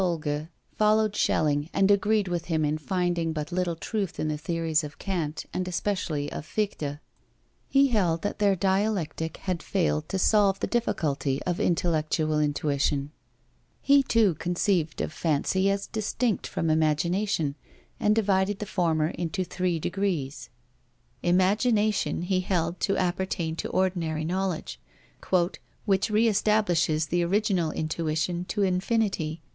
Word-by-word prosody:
Solger 155 -4 -1 0.3
followed 215 0 +3
Schelling 150 -3 +1
and 195 +1 +3
agreed 205 0 +2
with 175 -1 -2
him 160 -3 0
in 150 +1 -1
finding 175 -1 -1
but 155 -1 -4
little 175 -1 -1
truth 195 0 -3
in 155 - 0
the 155 - -1
theories 165 -1 0
of 150 0 -8
Kant, 165 -6 -3
and 180 0 -2
especially 170 -6 -2
of - - -5
Fichte. 155 -6 -2 0.7
He 275 0 +4
held 175 -8 +1
that 205 - -3
their 200 -2 +3
dialectic 190 -4 -1
had 180 -3 -1
failed 160 -5 -1
to 195 - -1
solve 195 0 +3
the - - 0
difficulty 145 - -1
of 180 +2 -2
intellectual 155 -4 +1
intuition. 145 -1 0 0.7
He 280 0 +5
too 225 -7 +3
conceived 175 -2 0
of - - -3
fancy 170 +5 +1
as 200 0 -1
distinct 220 0 -1
from 165 -1 -1
imagination, 160 +1 +1 0.5
and 210 0 +3
divided 200 -2 +2
the 210 - -5
former 165 -6 +1
into 175 +2 -3
three 180 -1 -1
degrees. 160 - -2 0.7
Imagination 205 +2 +2
he 185 +1 +1
held 175 -2 -1
to 195 - 0
appertain 175 -3 -1
to - - -3
ordinary 170 -4 0
knowledge, 175 - -2 1.1
"which 195 +1 +2
re 215 +2 +3
establishes 180 -7 +2
the 175 +3 0
original 185 -2 +1
intuition 160 +2 -2
to 205 +2 -1
infinity." 185 -4 0
175 Hz, 135 wpm, -27 LUFS, 155-200 Hz, 1.1 s, He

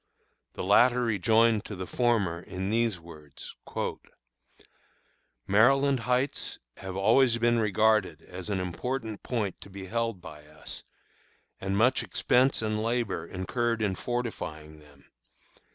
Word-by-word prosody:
The - - -5
latter 120 +6 +4
rejoined 115 0 +3
to 105 - -6
the 95 0 -5
former 105 -8 +1
in 95 +2 -4
these 115 -4 +1
words: 75 -4 -11 1.9
"Maryland 135 +6 +4
Heights 125 +3 -1 0.2
have 95 -1 -7
always 115 +5 +4
been 120 0 +2
regarded 105 -6 +2
as 90 +2 -8
an 100 -2 0
important 110 +5 -4
point 105 -7 -3
to - - -11
be 95 0 -8
held 115 0 -2
by 75 -4 -12
us, 75 0 -10 0.8
and 95 +1 -2
much 125 +5 +3
expense 125 -1 +2
and 110 0 -1
labor 115 -7 -1
incurred 115 +5 -1
in 100 -2 +1
fortifying 85 -10 -5
them. 70 -2 -20
110 Hz, 125 wpm, -28 LUFS, 90-120 Hz, 1.9 s, latter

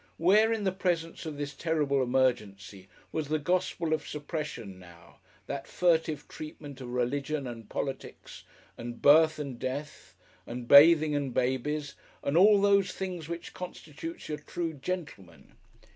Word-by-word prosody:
Where, 210 +7 +4
in 225 -2 -1
the 190 - +1
presence 170 -4 -2
of 150 -2 -6
this 145 0 -4
terrible 150 -3 0
emergency, 105 -7 -1 0.2
was 155 -2 -2
the 155 +2 +1
gospel 170 0 0
of 155 - -2
suppression 145 - -5
now 85 -2 -16 0.3
that 140 -1 -5
Furtive 160 -4 +1
treatment 145 -3 -9
of 125 - -7
Religion 140 +4 -1
and 115 -3 -8
Politics, 135 -1 -6 0.4
and 120 0 -6
Birth 155 +2 +6
and 140 -5 -6
Death 140 +4 -6 0.3
and 120 0 -6
Bathing 155 +2 +8
and 140 -4 -2
Babies, 140 +3 -1 0.3
and 140 - -1
"all 200 +4 +7
those 200 -1 +4
things" 180 -4 -5
which 170 0 -6
constitutes 165 -3 -8
your 150 -2 -4
True 165 +2 -4
Gentleman? 145 - -7
150 Hz, 145 wpm, -29 LUFS, 130-165 Hz, 0.4 s, Bathing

